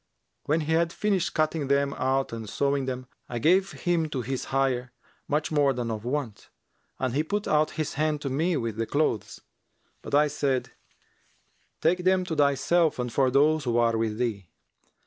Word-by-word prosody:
When 155 +3 +1
he 155 +1 -3
had 165 0 +2
finished 195 -3 0
cutting 155 -2 0
them 140 0 +2
out 135 -1 0
and 110 -2 -6
sewing 140 +2 0
them, 130 -1 -4 0.2
I 120 - -3
gave 185 +9 +3
him 170 -3 0
to 135 -4 -3
his 130 +2 -3
hire 130 -2 0 0.3
much 150 +2 -1
more 145 -3 +3
than 120 -2 -3
of 110 -1 -4
wont, 125 -4 -4 0.5
and 130 -2 -2
he 145 - +2
put 205 +6 -2
out 150 0 +3
his 155 -1 -2
hand 155 0 0
to 140 - -3
me 160 +5 +1
with 115 -4 -3
the 115 0 -1
clothes; 110 - -1 0.6
but - - -2
I 150 +1 +5
said, 140 -3 -1 1.1
'Take 180 +3 +2
them 185 0 +3
for 175 - -3
thyself 150 +3 +2
and 125 -1 -3
for 135 -2 +3
those 145 +3 +3
who 120 -1 +1
are 115 -1 +3
with 110 -1 -1
thee.' 105 -7 -2
140 Hz, 185 wpm, -27 LUFS, 125-155 Hz, 1.1 s, I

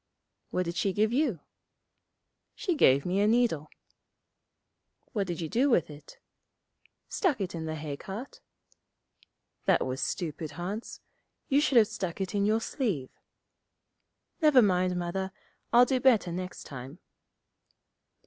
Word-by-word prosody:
'What 180 - -1
did 170 +1 -4
she 195 - +1
give 215 +3 +1
you?' 250 - +1 1.1
'She 365 - -1
gave 140 - +4
me 185 +2 0
a 205 - +3
needle.' 220 -10 +2 1.4
'What 200 -4 -1
did 175 -1 -4
you 160 - -2
do 255 - +2
with 170 - +2
it?' 145 0 -13 0.9
'Stuck 335 - 0
it 190 -3 -3
in 165 -1 -4
the 155 0 -3
hay 150 -2 -5
cart.' 215 - -8 1.2
'That - - +3
was 130 +1 -3
stupid, 155 -3 -3
Hans. 190 +8 -5 0.5
You 280 +2 +4
should 275 -4 +3
have 220 -2 +7
stuck 195 -6 -4
it 190 +1 -3
in 200 0 +1
your 220 +1 +2
sleeve.' 200 - -2 1.3
'Never 295 -6 +6
mind, 180 -2 +2
Mother; 185 +2 -2 0.4
I'll 245 +1 +7
do 260 0 +1
better 235 -9 +4
next 185 +1 -5
time.' 135 +3 -9
190 Hz, 140 wpm, -29 LUFS, 165-235 Hz, 1.4 s, have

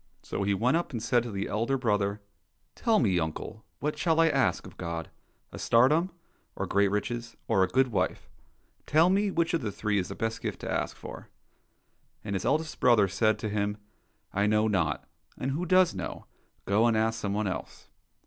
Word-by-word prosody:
So - - -4
he 100 0 +1
went 125 +10 +2
up 175 - -3
and 115 -3 -4
said 120 +1 +3
to 120 -1 -6
the 100 -1 -3
elder 115 +6 0
brother, 105 -4 0 0.3
" 85 +3 -47
Tell 230 -3 +2
me, 95 -7 +2
uncle, 80 +7 -5 0.2
what 150 +1 -2
shall 165 0 +2
I 165 0 +5
ask - - +1
of - - -12
God? 85 -1 -5 0.4
A - - -8
tsardom, 150 +10 +4 0.5
or - - -2
great 100 0 +3
riches, 115 +4 -3
or 95 - +3
a - - +2
good 130 +6 +2
wife? 105 - -1 0.6
Tell 165 +4 +5
me, 200 +1 +2
which 170 -2 0
of 165 - +1
the 110 -4 -2
three 105 0 0
is 90 - -2
the - - -7
best 115 +1 -3
gift - - -4
to - - -4
ask - - -2
for - - -9 0.2
} - - -44
" - - -45
— - - -39
^And 100 - -3
his 95 - -2
eldest 155 +3 0
brother 115 -5 +5
said 105 +3 +2
to 110 - -4
him, 105 0 -1 0.3
'' - - -42
I 100 +1 +2
know 110 +1 +3
not, 95 -8 0 0.3
and 135 - -2
who 170 +6 -2
does 185 -1 +5
know? - - -6 0.4
Go 105 +4 +3
and 115 -2 +2
ask 110 0 +1
some 100 -2 -2
one 105 +1 0
else." 95 - -5
110 Hz, 215 wpm, -28 LUFS, 100-135 Hz, 0.6 s, I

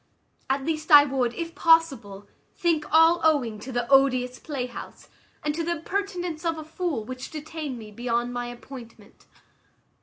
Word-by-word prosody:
At 270 0 0
least 310 -1 -3
I 290 -1 +10
would, 260 -4 0
if 335 -1 -5
possible, 270 -14 +2 0.3
think 330 -4 0
all 325 +2 +5
owing 265 -9 +2
to 255 +5 -8
the 240 -1 -2
odious 255 -2 +3
playhouse, 250 -5 -7 0.3
and 300 - 0
to 330 +2 -2
the 340 +1 0
impertinence 355 -1 -4
of 330 -1 -1
a 315 - -6
fool, 315 -7 -3
which 255 +2 -7
detained 305 -3 -6
me 215 -2 -10
beyond 240 +2 -2
my 245 0 -3
appointment. 240 -3 -12
280 Hz, 155 wpm, -25 LUFS, 245-325 Hz, 0.3 s, I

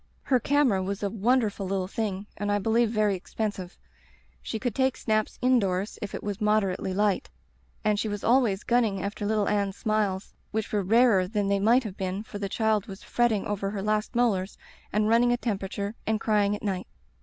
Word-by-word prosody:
"Her 255 -2 +2
camera 260 -6 +2
was 195 +2 -3
a 200 - 0
wonderful 220 -2 +1
little 190 -1 -1
thing 200 -1 -3
and 205 0 -2
I 205 - +3
believe 225 +3 +2
very 215 -2 +2
expensive. 190 -1 -4 0.6
She - - -4
could 245 0 -2
take 260 +1 +1
snaps 215 -1 0
in 255 0 +5
doors 195 0 -2
if 205 - -5
it - - -6
was 205 0 -4
moderately 210 -3 +1
light, 205 +1 +1 0.6
and 210 -1 +2
she 220 - -1
was 205 -1 -4
always 230 -5 +3
gunning 225 -5 +1
after 205 +1 -3
litde 210 -1 +1
Anne's 200 -2 0
smiles, 210 -3 -1 0.2
which 220 0 -3
were 205 - +2
rarer 210 -1 +4
than 205 0 -1
they 200 0 +2
might 235 +6 +4
have 205 -4 -7
been, 190 +2 -3
for 205 -2 -8
the 200 -1 -3
child 220 -1 +1
was 195 -1 -9
fretting 235 -4 +1
over 200 -1 -2
her 200 -1 -4
last 215 +2 -1
molars 210 -6 +1 0.3
and 210 +1 +1
running 235 +2 +4
a 245 - +2
temperature 200 -3 -3
and 220 0 +1
crying 210 -2 +2
at 205 - -9
night. 190 -3 -2
210 Hz, 200 wpm, -27 LUFS, 195-225 Hz, 0.6 s, in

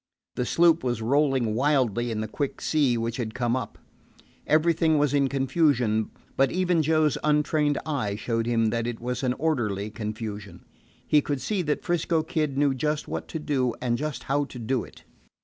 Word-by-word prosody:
The 125 - -2
sloop 170 -1 +4
was 120 -3 -1
rolling 135 -3 +2
wildly 120 -3 +1
in 110 -2 -2
the 110 - -3
quick 140 +6 -3
sea 140 -6 +2
which 115 0 -2
had 110 -3 -4
come 120 -1 0
up. 130 -5 -4 0.7
Everything 160 0 +3
was 145 -1 +2
in 140 -1 +3
confusion; 130 -5 +1 0.3
but 135 - +3
even 180 -2 +2
Joe's 155 -1 +2
untrained 150 0 +2
eye 125 -10 -1
showed 115 +1 -2
him 115 -2 +2
that 115 0 -1
it 120 -2 -4
was 125 +1 -3
an 125 -2 +1
orderly 115 -9 -1
confusion. 105 -3 -6 0.4
He 150 - +4
could 145 -1 -2
see 195 - -1
that 150 -3 -1
'Frisco 170 -2 0
Kid 150 -4 -2
knew 140 -1 +3
just 150 +3 -2
what - - -4
to - - -5
do 135 -6 -1
and 120 -2 0
just 145 -1 -4
how 145 +1 0
to 135 - -11
do 120 +1 -1
it. - - -14
135 Hz, 185 wpm, -26 LUFS, 115-150 Hz, 0.7 s, sloop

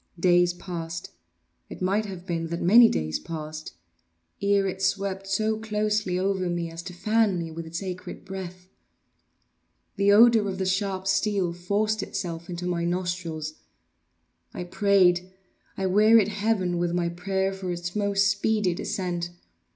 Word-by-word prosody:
Days 175 0 +4
passed—it 85 - -9
might 200 +4 0
have 185 -2 -8
been 165 -3 -2
that 170 +1 -4
many 225 +6 +7
days 80 0 -1
passed—ere 150 - -4
it 190 0 -4
swept 195 0 -1
so 215 +2 0
closely 210 -3 -1
over 190 -1 0
me 170 -1 -2
as 165 +1 -7
to 180 +1 -8
fan 215 +1 +2
me 165 -1 -4
with 165 0 -7
its 165 +4 -5
acrid 185 -1 -7
breath. 185 -1 -7 1.3
The 200 0 +4
odor 220 -1 +6
of 190 - -4
the 190 - -1
sharp 190 0 -1
steel 195 -2 +1
forced 205 +5 0
itself 170 -2 -5
into 175 0 -5
my 175 -1 -1
nostrils. 175 -3 -2 1.0
I - - -4
prayed—I 185 0 0
wearied 210 +2 +5
heaven 200 -4 0
with 175 0 0
my 175 -1 +1
prayer 190 +3 -1
for 190 -2 -4
its 175 +1 -5
more 200 -1 0
speedy 200 -1 +2
descent. 175 -1 -3
185 Hz, 140 wpm, -26 LUFS, 170-200 Hz, 1.3 s, many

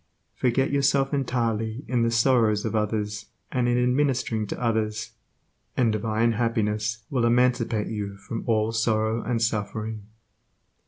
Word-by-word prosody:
Forget 130 +2 +1
yourself 140 0 +2
entirely 115 -3 -1
in 125 -2 +1
the 115 - +2
sorrows 115 -3 +3
of 110 - -2
others 105 -1 -2 0.2
and 125 -2 +1
in 125 +1 +2
ministering 125 -6 0
to - - -5
others, 110 -2 -1 0.7
and 120 -3 +3
divine 110 +2 +1
happiness 110 -1 -1
will 130 -4 +1
emancipate 120 -2 +2
you 100 -2 -4
from 115 +3 -6
all 110 -1 +2
sorrow 110 0 +1
and 115 +1 -1
suffering. 110 -1 -3
115 Hz, 130 wpm, -25 LUFS, 110-125 Hz, 0.7 s, sorrows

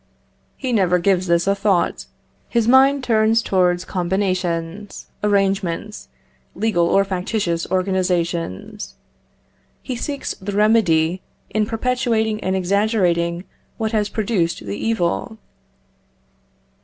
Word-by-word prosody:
He 260 -2 -3
never 185 -5 +3
gives 185 0 +1
this 170 0 +2
a 195 - +3
thought. 195 -2 0 0.4
His 235 -2 +1
mind 270 +2 +5
turns 225 -1 +3
towards 180 -1 +1
combinations, 185 0 -2 0.2
arrangements, 195 - 0 0.5
legal 195 -4 +1
or 195 +3 +3
factitious 180 -2 -2
organisations. 180 - -2 0.9
He 255 - -4
seeks 280 +3 -4
the 200 +1 -4
remedy 190 -5 +3 0.3
in 215 -1 0
perpetuating 225 -2 0
and 190 0 0
exaggerating 180 -3 +1 0.3
what 220 -1 -2
has 210 -2 0
produced 195 - -1
the 100 0 -4
evil. 220 - -1
195 Hz, 105 wpm, -20 LUFS, 175-220 Hz, 0.9 s, mind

